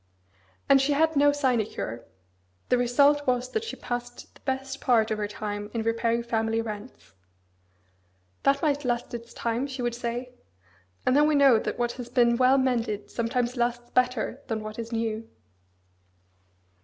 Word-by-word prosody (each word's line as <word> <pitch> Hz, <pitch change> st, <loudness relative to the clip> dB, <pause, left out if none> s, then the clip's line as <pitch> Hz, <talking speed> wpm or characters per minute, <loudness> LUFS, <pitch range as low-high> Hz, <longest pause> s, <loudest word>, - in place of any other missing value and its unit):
And 275 Hz, -1 st, +6 dB
she 285 Hz, +2 st, +2 dB
had 320 Hz, +2 st, +2 dB
no 290 Hz, 0 st, +5 dB
sinecure: 235 Hz, -, -1 dB, 0.6 s
the 250 Hz, -, +4 dB
result 285 Hz, +4 st, +3 dB
was 250 Hz, 0 st, 0 dB
that 440 Hz, -, -1 dB
she 455 Hz, -, -5 dB
passed 245 Hz, 0 st, -6 dB
the -, -, -21 dB
best 270 Hz, 0 st, -3 dB
part 225 Hz, -4 st, +3 dB
of 215 Hz, -, -1 dB
her 210 Hz, -, -1 dB
time 205 Hz, 0 st, -5 dB
in 225 Hz, -, 0 dB
repairing 230 Hz, +1 st, 0 dB
family 225 Hz, -1 st, 0 dB
rents. 215 Hz, -, -7 dB, 1.3 s
That 275 Hz, +2 st, +2 dB
might 290 Hz, -2 st, +1 dB
"last 240 Hz, -1 st, -2 dB
its 235 Hz, 0 st, -7 dB
time," 235 Hz, +3 st, -2 dB
she 260 Hz, -2 st, -5 dB
would 240 Hz, -1 st, 0 dB
say. 240 Hz, +1 st, -4 dB, 0.7 s
"And 255 Hz, -, +3 dB
then 295 Hz, +1 st, +5 dB
we 305 Hz, -, +2 dB
know 275 Hz, -5 st, +6 dB
that -, -, -3 dB
what 240 Hz, -1 st, 0 dB
has 240 Hz, -, -9 dB
been 235 Hz, -1 st, +3 dB
well 260 Hz, +2 st, +5 dB
mended 230 Hz, -6 st, -1 dB
sometimes 240 Hz, +1 st, -1 dB
lasts 240 Hz, 0 st, -1 dB
better 250 Hz, +1 st, 0 dB
than 220 Hz, -1 st, -3 dB
what 215 Hz, +1 st, -7 dB
is 230 Hz, 0 st, -5 dB
new." 225 Hz, -1 st, -2 dB
240 Hz, 165 wpm, -27 LUFS, 230-265 Hz, 1.3 s, And